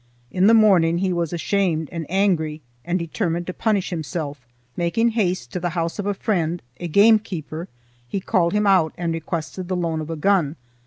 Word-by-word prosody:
In 185 +2 +3
the 225 - +7
morning 180 -7 +5
he 185 0 0
was 170 -2 -1
ashamed 175 -2 0
and 165 -4 -5
angry 165 -6 +1 0.2
and 175 +1 0
determined 170 0 -2
to 185 - -5
punish 205 -3 0
himself. 150 -5 -5 0.3
Making 200 +7 +1
haste 185 - -1
to - - -2
the 175 0 -1
house 170 +3 -2
of 205 - -2
a 205 - 0
friend, 175 -5 -1 0.2
a 175 - -4
gamekeeper, 185 -4 +2 0.4
he 195 - -2
called 180 -3 +1
him 210 0 +2
out, 185 -5 +3
and 170 -1 -1
requested 165 +1 -4
the 185 - -1
loan 165 -2 -1
of 155 - -7
a 165 - -3
gun. 165 -2 +2
175 Hz, 190 wpm, -22 LUFS, 165-195 Hz, 0.4 s, the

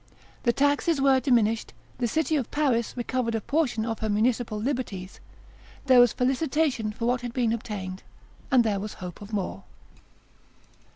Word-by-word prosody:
The 240 - +3
taxes 285 +4 +2
were 270 -1 +4
diminished; 230 -5 +1 0.3
the 240 - +1
city 315 +6 0
of 270 -6 -1
Paris 260 -6 0
recovered 240 -1 -1
a - - +1
portion 250 -3 0
of 225 -1 -3
her 220 - -2
municipal 220 +1 +1
liberties; 215 -7 -4 0.7
there 260 -2 +6
was 245 -2 +7
felicitation 260 -3 0
for 230 +2 -4
what 245 +1 +1
had 240 -1 -5
been 235 -3 +1
obtained, 195 -5 -5 0.5
and 255 -3 +5
there 210 -3 0
was 210 +2 -6
hope 180 0 -8
of 205 +1 -10
more. 200 -4 -3
240 Hz, 160 wpm, -26 LUFS, 215-265 Hz, 0.7 s, was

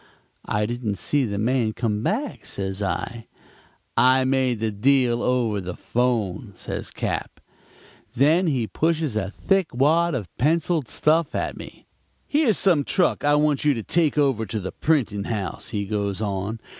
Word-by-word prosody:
"'I 105 +1 0
didn't 115 -2 -3
see 140 +9 +1
the 100 -3 -3
man 115 0 +1
come 105 -3 -1
back,' 245 - -2
says 95 0 -4
I. 115 +3 -3 0.7
"'I 130 +1 +4
made 130 -3 +1
the 110 0 -1
deal 120 +2 +2
over 120 -5 +1
the 90 -1 -6
'phone,' 115 -3 -1
says - - -5
Cap. - - -4 0.8
Then 160 +8 +4
he 130 -7 +1
pushes 160 0 0
a 100 -3 -1
thick 195 - 0
wad 160 +5 +3
of 105 -8 -6
penciled 160 +1 +1
stuff 155 +4 +1
at - - -2
me. - - -11 0.4
'Here's 285 -8 +2
some 170 -7 +3
truck 180 +4 +1
I 145 0 +4
want 150 -2 +2
you 145 -2 +3
to 115 - -4
take 160 +1 +1
over 135 -7 +2
to 110 +3 -3
the 95 -1 -5
printing 115 -10 0
house,' 100 -6 -4
he 105 -3 -2
goes 100 -1 -2
on. 100 +1 -3
125 Hz, 160 wpm, -23 LUFS, 105-150 Hz, 0.8 s, I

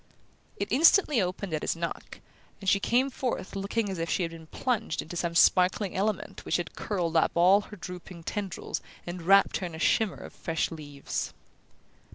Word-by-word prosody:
It - - -3
instantly 305 - +5
opened 185 0 -3
at 155 - -1
his - - -1
knock, 165 0 -5 0.4
and 195 - -9
she 200 - +5
came 255 +6 +2
forth 245 -7 -3
looking 200 +3 -1
as 190 -3 -4
if 165 0 -2
she 185 - +1
had 165 - -2
been 165 -1 -11
plunged 235 +3 -2
into 165 - -8
some 170 -1 -2
sparkling 185 +3 +4
element 205 +2 -2
which - - +1
had 175 -3 -5
curled 175 -5 -2
up 160 - +3
all 185 +4 +6
her 210 - -11
drooping 180 -1 -9
tendrils 195 0 -4 0.2
and 175 0 -5
wrapped 195 +3 +5
her 185 - -3
in 165 - -8
a - - -7
shimmer 200 +5 +2
of - - -10
fresh 165 -1 -2
leaves. 145 -3 -5
185 Hz, 190 wpm, -28 LUFS, 170-205 Hz, 0.4 s, all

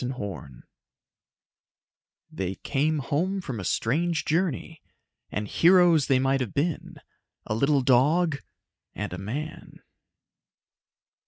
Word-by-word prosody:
net 125 +1 -4 2.1
_They 95 0 -4
came 155 +3 0
home 165 +8 -1
from 130 - -5
a - - -5
strange 155 - 0
journey.... 160 -1 -1 0.5
And 105 +1 -3
heroes 170 - +5
they 135 - +4
might 135 +1 +1
have 120 -6 -4
been 155 +2 -2 0.5
a - - -2
little 140 +5 +2
dog 145 +5 +3 0.6
and - - -4
a 90 - -5
man! 140 +11 -7
145 Hz, 105 wpm, -26 LUFS, 125-165 Hz, 2.1 s, heroes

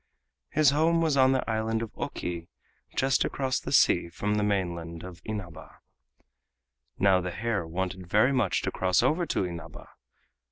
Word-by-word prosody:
His 150 -2 +4
home 160 +3 +3
was 160 -3 +2
on 130 -1 +5
the 130 -1 0
island 110 0 -1
of 115 - -7
Oki, 85 -1 -5 0.4
and - - -23
just 135 0 +3
across 130 -2 -1
the - - -6
sea 85 - +4
was 85 - -15 0.2
the 105 - +1
mainland 85 -5 -2
of 90 -2 -10
Inaba. 95 -8 -7 1.2
Now 95 -1 +4
the 90 - -3
hare 105 -2 -2
wanted 95 +1 -4
very 110 +8 +4
much 110 -10 +1
to - - -1
cross 95 +3 +1
over 160 +7 +1
to - - 0
Inaba. 85 -1 -8
105 Hz, 165 wpm, -28 LUFS, 90-130 Hz, 1.2 s, on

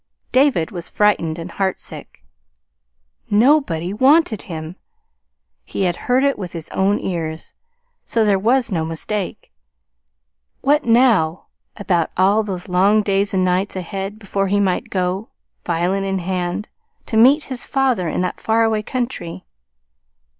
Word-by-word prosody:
David 255 - +3
was 175 -2 -5
frightened 175 -6 +1
and 170 +1 -7
heartsick. 190 0 -4 1.1
NOBODY 205 - +2
WANTED 260 - +3
HIM. 160 0 -7 0.9
He - - -3
had 175 -2 +1
heard 255 +2 +4
it 280 -4 +1
with 180 -4 -6
his 165 -2 -7
own 200 +2 +1
ears, 160 -3 -4 0.5
so 225 -2 +1
there 200 -2 +3
was 240 +4 +2
no 165 -4 0
mistake. 175 +5 -4 1.1
What 290 +2 +2
now 225 -9 +3 0.3
about 180 -5 0
all 195 +4 +4
those 190 -4 -5
long 195 +4 +3
days 200 0 +1
and 185 -1 +2
nights 185 +3 0
ahead 195 +3 -5
before 195 -2 -2
he 205 +1 +1
might 190 -3 0
go, 185 +3 -2 0.4
violin 175 +3 0
in 195 0 -1
hand, 180 +2 -3 0.4
to 225 - -4
meet 265 +7 +6
his 260 -3 -5
father 255 - +1
in - - -1
that 180 - -3
far 225 +1 +2
away 220 -1 +1
country? 240 - -4
195 Hz, 140 wpm, -20 LUFS, 180-225 Hz, 1.1 s, meet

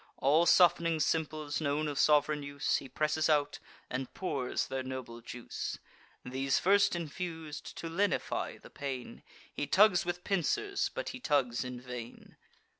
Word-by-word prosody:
All 155 +5 +4
soft'ning 170 -2 +5
simples, 155 -1 -1
known 150 +1 0
of 145 -2 -3
sov'reign 150 0 +4
use, 140 0 0
He 135 - -8
presses 155 +2 +1
out, 145 -1 +2 0.3
and 130 0 -4
pours 135 -9 -1
their 130 0 -3
noble 130 -3 -6
juice. 120 +1 -5 0.5
These 130 +2 0
first 200 +2 +4
infus'd, 160 -2 -5
to 165 - -5
lenify 195 +5 -1
the - - -15
pain, 135 -3 -6 0.3
He 145 - -3
tugs 190 +2 +5
with 175 0 -3
pincers, 395 - 0
but - - -3
he 255 - -7
tugs 135 - +1
in 125 -1 -6
vain. 125 -2 -9
150 Hz, 145 wpm, -32 LUFS, 130-170 Hz, 0.5 s, soft'ning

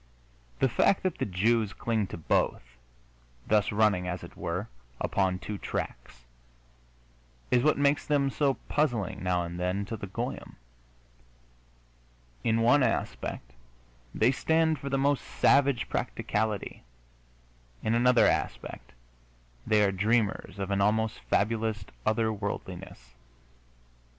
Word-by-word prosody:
The 135 - +3
fact 160 - +2
that 185 - -1
the - - -1
Jews 105 +3 +1
cling 110 -4 -1
to - - -7
both, 80 - 0 0.8
thus 105 -1 +2
running, 105 -4 +2
as 90 0 -4
it - - -11
were, 90 +6 -3 0.3
upon 95 -2 0
two 100 +2 -6
tracks, - - -6 1.3
is 125 - +4
what 155 +4 +3
makes 145 +1 +2
them 140 -2 +2
so 140 -2 +1
puzzling, 120 - 0
now 90 -1 +1
and 85 +1 -6
then, 90 +3 -1
to 115 - -5
the 100 -2 -7
goyim. 95 - -5 1.9
In 115 0 +2
one 140 +5 +5
aspect 60 - -2 0.6
they 115 +4 +4
stand 160 +2 +1
for 140 - -5
the 135 - +1
most 140 0 +1
savage 140 -3 +3
practicality; 105 -1 -2 1.0
in 110 - +1
another 125 +1 +5
aspect - - -2 0.7
they 105 -1 +4
are 100 - +3
dreamers 105 +2 0
of 100 0 -3
an 100 0 +1
almost 110 +2 +1
fabulous 110 -1 0 0.2
other 110 0 +2
worldiness. 95 - -6
110 Hz, 125 wpm, -28 LUFS, 95-125 Hz, 1.9 s, one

